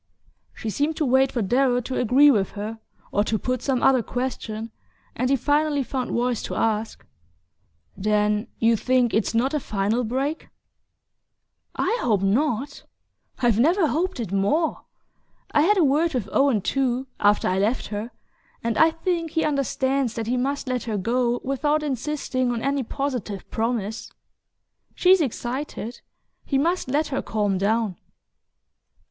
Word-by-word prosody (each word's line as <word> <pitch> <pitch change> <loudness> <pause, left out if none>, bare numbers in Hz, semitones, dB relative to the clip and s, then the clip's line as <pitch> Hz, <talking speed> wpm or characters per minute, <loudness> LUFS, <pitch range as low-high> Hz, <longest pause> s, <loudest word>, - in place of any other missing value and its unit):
She 220 - -4
seemed 300 +7 -1
to 305 - +1
wait 265 +1 +3
for 235 - -1
Darrow 245 +4 +2
to 255 +2 -3
agree 270 +5 +6
with 200 -6 0
her, 215 +2 -5 0.3
or 205 - +2
to 220 - 0
put 255 +3 -2
some 265 -3 0
other 260 -2 +5
question, 230 -3 -4 0.4
and 255 +2 0
he 275 - +4
finally 290 +2 +1
found 255 0 -3
voice 240 -1 0
to - - -5
ask: 220 0 -1 0.9
"Then 210 +1 +1
you 230 0 +3
think 250 +2 +1
it's 220 +1 0
not 255 +5 +1
a 300 - +1
final 215 +1 -1
break?" 270 +7 -2 1.3
"I 475 - 0
hope 210 -5 +1
not 260 +6 0 0.6
I've 230 -3 +3
never 335 - +4
hoped 355 0 -1
it 220 -6 -4
more! 205 +12 0 0.7
I 290 - +4
had 405 +7 +4
a 360 - +4
word 300 +2 +2
with 225 -6 -1
Owen, 275 -6 +3
too, 260 +3 0
after 205 0 +3
I 185 +1 +1
left 220 +6 0
her, 210 +2 -4 0.5
and 230 -1 -1
I 320 - +7
think 330 0 -2
he 320 +1 0
understands 275 -3 0
that 225 - -3
he 240 +3 0
must 275 +3 -2
let 250 -1 -2
her 220 -3 -2
go 240 +4 0
without 295 +3 0
insisting 260 -2 -1
on 230 -1 -3
any 275 0 +1
positive 245 -6 -4
promise. 225 -2 -2 0.8
She's 370 0 +5
excited... 250 -2 -4 0.4
he 275 - 0
must 340 +4 0
let 295 +4 0
her 270 - -1
calm 205 -3 -1
down..." 210 -2 0
250 Hz, 155 wpm, -24 LUFS, 220-280 Hz, 1.3 s, I